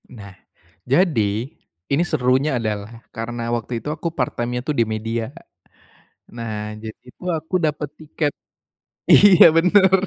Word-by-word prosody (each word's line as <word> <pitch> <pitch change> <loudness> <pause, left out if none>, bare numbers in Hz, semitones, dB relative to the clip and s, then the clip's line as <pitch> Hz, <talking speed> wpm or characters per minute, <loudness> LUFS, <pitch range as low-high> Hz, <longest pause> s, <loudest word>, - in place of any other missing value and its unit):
Nah, 100 -6 -11 0.6
jadi, 125 - +1 0.4
ini 145 +5 +3
serunya 130 +2 +1
adalah 110 0 -5
karena 120 +1 -5
waktu 120 +1 -5
itu - - -4
aku 170 - -4
part 125 -3 -1
time-nya 120 +1 -2
tuh 150 - +1
di - - +6
media, 110 +1 -3
Kak. 170 - -15 0.9
Nah, 115 -2 -5 0.3
jadi 110 -1 -8
itu 125 - -17
aku 160 +4 -5
dapat 150 -1 -2
tiket, 150 -2 -2 0.8
iya 195 -3 +8
bener, 190 +3 +5
125 Hz, 135 wpm, -21 LUFS, 115-155 Hz, 0.9 s, iya